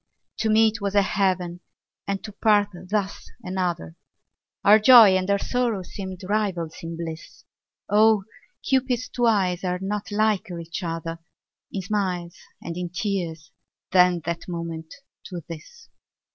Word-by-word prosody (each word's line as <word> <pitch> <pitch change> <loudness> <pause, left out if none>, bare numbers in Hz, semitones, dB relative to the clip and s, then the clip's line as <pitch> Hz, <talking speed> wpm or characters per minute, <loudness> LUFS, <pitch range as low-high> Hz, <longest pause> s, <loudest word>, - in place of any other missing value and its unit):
To 220 - +1
meet 220 0 +3
was 200 0 -2
a 200 - +5
heaven 185 -3 0 0.5
and 195 -1 -2
to 215 - -7
part 205 -1 +3 0.2
thus 200 -1 -2
another, 180 - -3 0.7
Our 210 +2 +7
joy 220 -4 +9
and 185 +1 0
our 200 - +4
sorrow 235 -3 -1
seemed 190 +1 -8
rivals 190 -6 -1
in 165 0 -6
bliss; 165 -1 -8 0.4
Oh! 215 -1 +4 0.4
Cupid's 255 -2 +1
two 240 -1 +1
eyes 190 -5 +1
are 180 -1 -1
not 205 +2 -4
liker 205 -4 0
each 170 +3 -6
other 165 -1 -4 0.5
In 195 - -4
smiles 185 -4 -2 0.3
and 170 - -5
in 180 -1 -3
tears 175 -4 -3 0.4
than 180 -1 +5
that 170 +2 -4
moment 165 -2 -5 0.3
to 175 -4 -7
this. 170 - -11
190 Hz, 140 wpm, -24 LUFS, 170-210 Hz, 0.7 s, joy